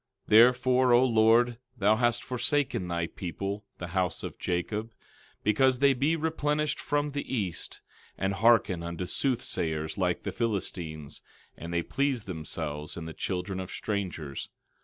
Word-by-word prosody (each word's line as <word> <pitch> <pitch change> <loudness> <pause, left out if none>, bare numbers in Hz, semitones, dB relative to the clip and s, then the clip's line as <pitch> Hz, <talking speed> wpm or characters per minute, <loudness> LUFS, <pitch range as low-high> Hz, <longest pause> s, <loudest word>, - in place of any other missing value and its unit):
12:6 - - -20
Therefore, 125 +2 +6
O 120 +2 +6
Lord, 115 0 +4 0.2
thou 105 +1 +4
hast 120 +2 +1
forsaken 130 -5 0
thy 85 -1 -1
people, 100 +5 -5
the 90 - -6
house 90 -1 -1
of - - -6
Jacob, 105 +6 -2 0.5
because 125 +5 +3
they 140 +1 +5
be 140 +6 +1
replenished 150 -2 0
from 145 0 -1
the 145 0 -4
east, 95 -7 -3 0.4
and 95 +1 0
hearken 100 -5 +4
unto 85 +1 -4
soothsayers 85 - -2
like 90 -2 0
the 100 - -3
Philistines, 90 - -3 0.3
and 85 +1 -7
they 85 0 0
please 135 -1 0
themselves 80 -4 -5
in 85 - -5
the 80 - -6
children 95 +2 -3
of 95 -1 -5
strangers. 90 -11 -4
105 Hz, 145 wpm, -29 LUFS, 85-125 Hz, 0.5 s, Therefore